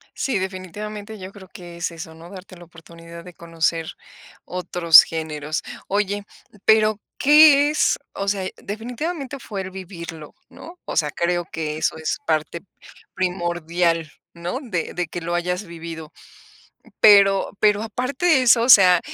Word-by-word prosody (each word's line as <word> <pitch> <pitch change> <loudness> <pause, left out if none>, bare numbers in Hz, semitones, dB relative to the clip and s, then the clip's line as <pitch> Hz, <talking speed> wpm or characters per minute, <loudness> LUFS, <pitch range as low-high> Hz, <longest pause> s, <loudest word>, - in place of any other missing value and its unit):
Sí, 270 -7 -1
definitivamente 205 +3 -6
yo 185 0 -9
creo 195 -2 -14
que 175 -1 -12
es 170 - -2
eso, 165 0 -9
¿no? 165 +2 -13
Darte 185 -1 -12
la 175 - -14
oportunidad 170 0 -13
de 180 - -12
conocer 165 -1 -2 0.6
otros 175 -2 +5
géneros. 155 -1 -4 0.2
Oye, 205 0 -1 0.4
pero, 215 -1 +4 0.2
¿qué 295 0 +7
es? 305 - +1 0.2
O 200 - -4
sea, 195 -2 -1
definitivamente 260 - -5
fue 205 -5 -7
el 190 0 -6
vivirlo, 170 -5 -9
¿no? 350 +2 -13
O - - -5
sea, 150 -2 +1
creo 175 +2 -1
que 155 -1 -4
eso 160 - -1
es 160 - -2
parte 160 +1 -1 0.5
primordial, 175 -3 -1 0.2
¿no? 175 +10 -5
De 185 -10 -4
de 175 -2 -3
que 175 - -6
lo 170 +1 -4
hayas 180 +3 -2
vivido. 165 -2 -9 0.9
Pero 200 -2 +5
pero 210 0 +3
aparte 250 +8 -4
de 320 -7 +5
eso, 235 -2 +5
o 245 - -1
sea, 185 -6 +8
180 Hz, 150 wpm, -21 LUFS, 170-210 Hz, 0.9 s, sea